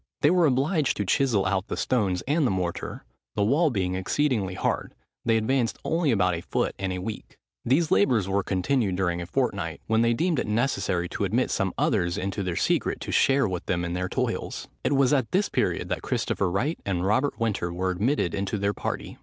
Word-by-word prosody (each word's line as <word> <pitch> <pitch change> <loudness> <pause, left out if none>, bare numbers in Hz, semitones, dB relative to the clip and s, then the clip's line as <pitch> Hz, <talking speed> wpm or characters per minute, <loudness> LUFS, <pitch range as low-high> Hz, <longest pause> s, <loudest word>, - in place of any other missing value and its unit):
They 150 - +5
were 175 -3 +4
obliged 145 +3 +1
to 105 - -1
chisel 115 -3 +2
out 95 +2 0
the - - -4
stones 100 -8 0
and 150 0 +2
the - - +1
mortar; 90 -3 -3 0.3
the 105 - +2
wall 145 +10 +3
being 95 -7 -1
exceedingly 95 0 0
hard, - - -2 0.3
they 115 -1 +3
advanced 120 +1 0
only 165 -2 +1
about 95 -6 +2
a 85 - -3
foot - - -1
in 95 -1 -2
a 90 - -3
week. 105 +4 -6 0.3
These 150 +6 +2
labours 100 0 +3
were 100 +1 +1
continued 100 +2 0
during 90 -2 0
a 85 - -6
fortnight, 95 -8 -1
when 110 0 +2
they 115 0 +3
deemed 165 +1 +1
it - - -2
necessary 105 -6 0
to 100 - -3
admit 115 +6 +1
some 95 -3 0
others 90 -3 +1
into 100 +1 -2
their 90 -3 -2
secret, - - 0
to - - -4
share 135 -2 +3
with 90 -1 -4
them 85 -1 0
in 85 - -3
their 90 +1 -2
toils. - - -3 0.2
It - - +1
was 135 0 +3
at 130 -5 +1
this 200 +2 +2
period - - 0
that - - -2
Christopher 100 - -1
Wright 125 - -1
and 95 -2 -1
Robert 130 +8 +1
Winter 105 -6 -1
were 95 +2 -1
admitted 100 - 0
into 100 +2 -2
their 100 +1 0
party. - - -5
105 Hz, 210 wpm, -26 LUFS, 95-135 Hz, 0.3 s, They